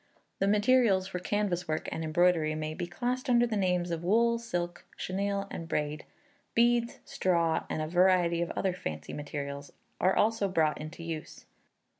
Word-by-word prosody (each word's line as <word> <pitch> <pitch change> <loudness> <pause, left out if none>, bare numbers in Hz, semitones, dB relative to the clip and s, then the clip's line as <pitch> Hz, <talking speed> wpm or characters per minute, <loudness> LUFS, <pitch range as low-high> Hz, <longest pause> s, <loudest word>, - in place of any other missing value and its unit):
The 195 - +2
materials 210 -2 +4
for 190 -1 -4
canvas 180 -2 -1
work 155 0 -2
and 160 - -3
embroidery 160 -1 +2
may 155 0 -3
be 175 - -4
classed 250 +8 -2
under 240 -1 +5
the 230 -2 -2
names 180 -3 +1
of 165 0 -3
wool, 230 +5 +3
silk, 175 -7 -4
chenille, 200 +1 -2
and 165 - -6
braid; 150 -1 -2 0.5
beads, 235 0 +3
straw, 170 -3 +1
and 155 - -2
a - - -3
variety 175 0 +3
of 170 - -1
other 190 -2 0
fancy 80 - -6
materials, 140 -1 -5 0.3
are 185 - +3
also 215 -1 +2
brought 155 -5 +1
into 155 +2 -8
use. 165 -2 -7
180 Hz, 165 wpm, -30 LUFS, 160-205 Hz, 0.5 s, under